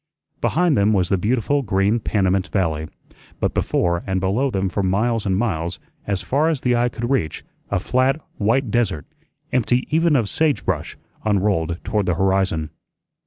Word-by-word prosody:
Behind 175 -2 +2
them 105 +1 +3
was 90 -4 +1
the 95 - +2
beautiful 125 +7 +1
green 100 0 +1
Panamint 95 -3 +1
Valley, 80 -6 -1 0.5
but - - 0
before 85 -1 0
and 95 0 0
below 100 +9 +1
them 95 -5 -1
for 100 +2 -2
miles 105 +4 0
and 95 -1 +1
miles, 90 -6 -1 0.3
as 100 -2 -1
far 150 +5 +1
as 155 -5 -1
the 125 -1 +2
eye 120 +1 +2
could 120 0 -4
reach, 80 - -1 0.3
a 100 - +1
flat, 130 - +1 0.2
white 115 +3 +1
desert, 100 -11 0 0.5
empty 125 0 +1
even 165 -1 +3
of 115 -6 +2
sage 155 +4 0
brush, 80 -6 -2 0.3
unrolled 95 -6 +1
toward 105 -2 -1
the 90 - +1
horizon. 95 -4 +1
100 Hz, 165 wpm, -21 LUFS, 95-125 Hz, 0.5 s, them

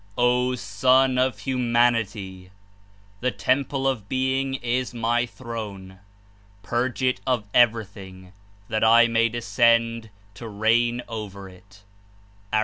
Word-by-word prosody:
"O 125 +1 +2
Son 130 +3 +2
of 130 0 0
Humanity! 115 -7 -1 0.7
The 125 - 0
temple 130 +6 -1
of 115 -7 -2
Being 130 +1 -1
is 125 0 -2
my 120 +1 0
Throne. 105 -7 -8 0.6
Purge 120 +6 -2
it 130 0 +1
of 125 -4 +1
everything, 100 -6 0 0.3
that 110 -1 -1
I 115 +1 +6
may 115 0 +2
descend 115 -1 +1 0.2
to 115 +4 -9
reign 120 +3 +1
over 105 -4 -7
it 100 +2 -19 0.7
J' 110 - +2
(A. - - +4
115 Hz, 120 wpm, -24 LUFS, 105-125 Hz, 0.7 s, I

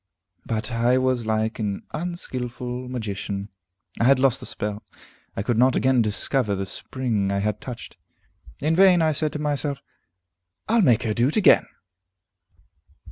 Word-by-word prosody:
But 110 +1 -2
I 120 +2 +2
was 130 -3 0
like 110 +1 -1
an 100 -3 -3
unskilful 125 -7 -4
magician; 100 -4 -4 0.5
I 115 - +2
had 135 +1 +6
lost 130 -2 +2
the - - -7
spell; 105 0 -4 0.6
I 100 - -1
could 115 0 0
not 130 +1 +4
again 130 -2 +3
discover 105 +1 0
the 95 0 -3
spring 110 -2 -2
I 100 - 0
had 105 +1 -1
touched. 125 -3 -8 0.6
In 155 +3 +1
vain 180 -2 +6
I 160 - +3
said 155 0 -1
to - - -2
myself, 145 -1 -2 0.8
"I'll 230 +1 +3
make 120 - +4
her 110 -2 0
do 120 +3 +2
it 150 - -1
again!" 205 - +5
125 Hz, 155 wpm, -24 LUFS, 110-140 Hz, 0.8 s, had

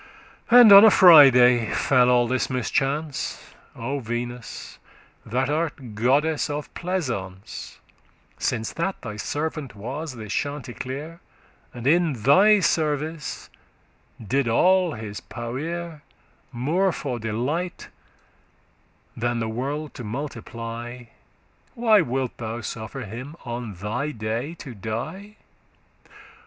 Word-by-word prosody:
*regarded 245 - +8
And 215 -3 +9
on 200 +1 +11
a - - +9
Friday 125 - +7
fell 125 -2 +3
all 120 -1 +4
this 130 +1 -1
mischance. 135 +3 -2 0.2
O 135 +5 -3
Venus, 120 0 -6 0.4
that 125 +4 -1
art 145 -6 -3
goddess 140 +9 +1
of 145 0 -5
pleasance, 120 - -5 0.6
Since 110 0 -2
that 190 +3 -2
thy 105 -3 -6
servant 145 0 -4
was 130 +8 -6
this 110 -3 -6
Chanticleer 145 +3 -5 0.5
And 120 0 -9
in 165 +2 +3
thy 190 - +5
service 155 -2 -2 0.7
did 130 +4 -1
all 180 +8 +3
his 110 -3 -7
powere, 155 +7 -6 0.5
More 160 +11 +1
for 130 -7 -4
delight, 130 +12 -3 1.3
than 120 +1 -1
the 115 - -2
world 140 +6 -4
to 125 - -8
multiply, 120 -1 -6 0.7
Why 225 -4 +4
wilt 130 -4 -3
thou 115 0 -5
suffer 110 +5 -6
him 125 +7 -8
on 120 -3 -5
thy 110 +10 -3
day 115 +8 -4
to 135 -6 -9
die? 135 - -6
130 Hz, 110 wpm, -24 LUFS, 115-155 Hz, 1.3 s, on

